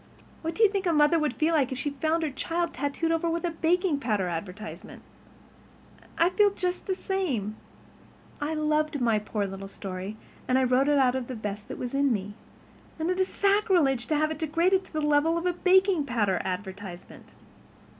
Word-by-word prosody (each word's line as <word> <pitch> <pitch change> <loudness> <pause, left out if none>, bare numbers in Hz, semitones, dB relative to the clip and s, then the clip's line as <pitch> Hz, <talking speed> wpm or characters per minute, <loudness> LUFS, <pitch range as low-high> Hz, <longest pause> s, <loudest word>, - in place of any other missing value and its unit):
What 325 0 -3
do 450 - +3
you 430 - +7
think 395 -2 -1
a 340 - +3
mother 300 +2 +4
would 300 -5 -1
feel 315 +2 +1
like 280 -4 +2
if 260 - -3
she 285 +2 -2
found 315 +4 0
her 305 - -1
child 335 +5 -2
tattooed 285 +5 -1
over 330 +1 +1
with 335 +1 -1
a 345 - 0
baking 335 -1 +1
powder 210 -8 0
advertisement? 180 +5 -7 1.1
I 340 +2 +4
feel 415 +1 +4
just 365 -2 -3
the 380 - 0
same. 285 - -2 0.9
I 305 +2 -1
loved 305 0 0
my 230 -3 +2
poor 210 -1 -2
little 195 0 -6
story, 195 +1 -6 0.3
and 255 - +3
I 260 - +3
wrote 255 +2 +3
it 295 -1 +4
out 255 -2 +4
of 255 -2 -3
the 255 - -5
best 210 -1 -5
that - - -7
was 245 0 -5
in 280 0 +2
me. 205 -2 -2 0.6
And 320 +3 -1
it 365 - -2
is 375 - +2
sacrilege 380 - +2
to 310 - +1
have 310 +1 +1
it 310 - -5
degraded 340 +5 +2
to - - -17
the 310 - -1
level 300 +3 +3
of 335 - -3
a 360 - +2
baking 370 -3 +3
powder 210 -6 +1
advertisement. 190 -1 -7
295 Hz, 200 wpm, -27 LUFS, 235-335 Hz, 1.1 s, you